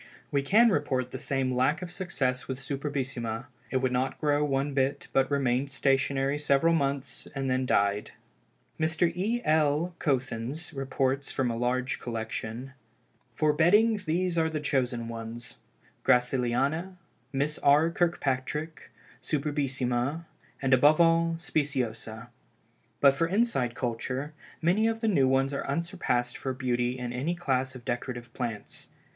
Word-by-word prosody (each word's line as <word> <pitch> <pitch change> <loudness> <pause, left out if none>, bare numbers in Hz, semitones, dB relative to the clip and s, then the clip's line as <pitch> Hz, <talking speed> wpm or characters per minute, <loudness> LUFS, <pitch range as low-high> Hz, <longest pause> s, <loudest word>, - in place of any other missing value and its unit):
We 140 - +2
can 215 +11 +5
report 130 -8 0
the 130 - -5
same 135 -2 0
lack 140 +7 +1
of 175 - -6
success 140 -9 -1
with 130 - -3
Superbissima. 135 -4 -3 0.2
It 130 - +1
would 130 - +2
not 130 +1 -1
grow 145 -1 +2
one 140 0 0
bit, 135 +1 0
but 135 0 +3
remained 135 -1 +1
stationary 135 +1 +1
several 150 +3 +3
months, 140 -4 -1
and 135 -1 -1
then 130 0 0
died. 100 -1 +2 0.7
Mr. 160 +2 +1
E. 220 +7 -1
L. 155 +2 +2
Koethens 135 +3 -2
reports 135 0 -1
from 125 -3 0
a - - -3
large 125 +2 -1
collection: 115 +2 -5 0.6
"For 155 +2 +3
bedding 210 +8 +4
these 180 -1 0
are 160 0 +2
the 155 -1 -2
chosen 125 -5 -1
ones, 115 0 -6 0.5
Gracilliana, 135 +8 +1 0.3
Miss 145 +3 -1
R. 150 +4 +4
Kirkpatrick, 155 -2 -1 0.3
Superbissima, 140 -1 -1 0.4
and 135 0 +3
above 145 +5 +6
all, 165 0 +4
Speciosa. 125 -7 -2 0.7
But 140 -1 +7
for 165 +4 +1
inside 180 - +1
culture, 125 +5 -3 0.3
many 195 +7 +3
of 225 0 -1
the 225 - +1
new 140 -11 +4
ones 135 +1 +2
are 140 - -3
unsurpassed 140 -6 -1
for 130 - -3
beauty 125 -1 -1
in 125 -1 -4
any 145 +8 -1
class 130 -5 -1
of 120 -2 -11
decorative 120 -1 -4
plants. 115 -5 -5
135 Hz, 140 wpm, -28 LUFS, 125-155 Hz, 0.7 s, But